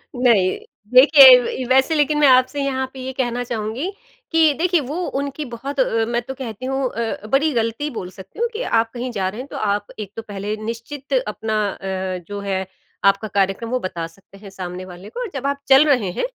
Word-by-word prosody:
नहीं। 230 -7 +3 0.4
देखिए 265 -1 +9 0.3
व - - -8
वैसे 265 +5 +3
लेकिन 295 0 +2
मैं 290 - +6
आपसे 255 +2 +4
यहाँ 265 -1 -1
पे 265 - -10
ये 260 +1 -5
कहना 245 -2 -2
चाहूँगी 235 - -3 0.4
कि 320 -2 +4
देखिए, 355 0 +2
वो 290 +5 -5 0.2
उनकी 285 +1 -5
बहुत 275 +4 -6
अ, 225 -3 +2
मैं 240 0 -1
तो 265 +3 -7
कहती 250 -2 -7
हूँ 270 +1 -1
अ, 225 -2 -4
बड़ी 285 +7 +2
गलती 230 +5 -1
बोल 180 - -5
सकती 190 - -12
हूँ 475 - +2
कि 450 - -4 0.2
आप 225 0 -1
कहीं 245 0 -4
जा 190 -1 0
रहे 215 +6 -7
हैं, 270 - -9
तो - - -8
आप 205 -1 -1
एक 205 -2 -6
तो 225 - -5
पहले 205 0 -5 0.2
निश्चित 270 - -8
अपना 220 0 -3 0.2
अ, 190 -1 -4
जो 205 0 -5
है 190 0 -1 0.4
आपका 195 +2 +2
कार्यक्रम 200 +3 -1
वो 255 - 0
बता 170 -5 -4
सकते 195 0 -19
हैं 200 -1 -12
सामने 185 -1 -7
वाले 180 +2 -11
को। - - -5
जब 270 +1 -2
आप 280 0 -1
चल 270 +3 +7
रहे 235 -10 +2
हैं, - - -2
240 Hz, 210 wpm, -20 LUFS, 200-275 Hz, 0.4 s, देखिए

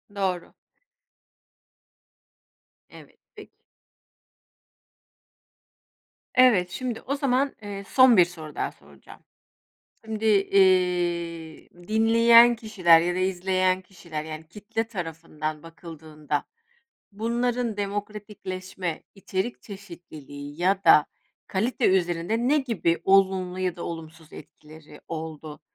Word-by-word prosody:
Doğru. 185 -3 -2 2.4
Evet, - - -16 0.2
peki. 420 - -13 2.8
Evet, 230 -9 +5
şimdi 230 +5 -5
o 280 - -3
zaman, 275 0 0
eee, 200 -1 -7
son 255 -4 +6
bir 180 - +7
soru 160 -4 -11
daha - - -2
soracağım. - - -17 0.9
Şimdi, 220 0 -5
eee, 180 -5 +1 0.2
dinleyen 230 +2 +6
kişiler 190 -8 +4
ya 175 +1 -1
da - - -2
izleyen 185 0 0
kişiler, 170 -5 -8
yani 155 0 -8
kitle 210 +4 -4
tarafından 160 -5 -6
bakıldığında 160 -3 -6 0.7
bunların 235 +1 -1
demokratikleşme, 200 -3 -5
içerik 195 +3 -4
çeşitliliği 160 -7 -11
ya 195 +2 +1
da 150 - +6 0.4
kalite 225 +5 0
üzerinde 185 +6 0
ne 300 +1 +4
gibi 225 -10 -1
olumlu 190 -1 +2
ya 185 -2 -2
da 170 - -7
olumsuz 160 -1 -8
etkileri 155 0 -14
oldu? 155 -2 -7
185 Hz, 95 wpm, -25 LUFS, 165-215 Hz, 2.8 s, bir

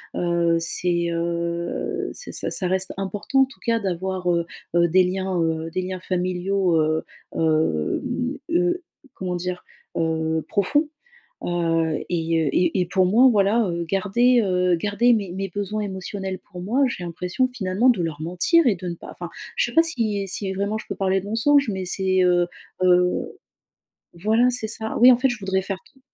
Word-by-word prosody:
Heu, 170 -1 +1
c'est, 170 0 0
heu, 170 0 -2
c'est - - -5
ça - - -3
ça 185 - -1
reste 190 +1 -1
important 200 +7 0
en - - +6
tout 265 - -17
cas 230 -1 +2
d'avoir, 185 -2 -2
heu 170 -1 +1 0.3
heu, 170 0 +5
des 185 +3 +4
liens, 190 0 -1
heu, 160 0 -1
des 185 +2 -1
liens 185 0 -4
familiaux, 185 0 0
heu, 155 +1 0 0.3
hem, 160 - 0
heu, 355 +1 +1 0.3
comment 180 -1 -3
dire? 180 +1 -4 0.3
Heu, 160 -1 0
profonds, 290 - +1 0.6
heu 165 -2 0
et 165 -2 0
heu, - - +2
et 180 +1 +2
et - - +1
pour 185 +1 +2
moi 235 +8 +6
voilà, 210 +1 +3
heu, 170 0 -2
garder, 210 +7 +3
heu, 180 -2 +2
garder 210 +7 +2
mes 200 -5 -1
mes 195 +2 -4
besoins 205 +3 -3
émotionnels 190 -1 -4
pour 180 -3 -11
moi 235 +10 +1
j'ai 210 -7 -5
l'impression 180 +8 -1
finalement 225 -1 +1
de 225 -8 +3
leur 155 -2 -4
mentir 180 - +3
et 220 - +3
de 180 +1 -7
ne 170 - -3
pas - - -12
enfin - - -7 0.3
je 485 - +2
sais - - -7
pas 330 - +7
si 215 - -1
si 190 0 -3
vraiment 200 +3 -1
je - - -8
peux - - -4
parler 190 0 +1
de - - -11
mensonge, 245 +6 +3
mais 190 -1 -4
c'est, 185 +1 +1
heu 175 -1 +3 0.4
heu 180 0 +2 0.8
voilà 220 +8 +2
c'est 240 -3 -2
ça, 220 0 -4
oui, 250 +2 +9
en - - +5
fait, 265 +1 +3
je 245 -3 -3
voudrais 190 -1 -1
faire 195 0 -4
t 275 - -24
185 Hz, 185 wpm, -23 LUFS, 175-215 Hz, 0.8 s, oui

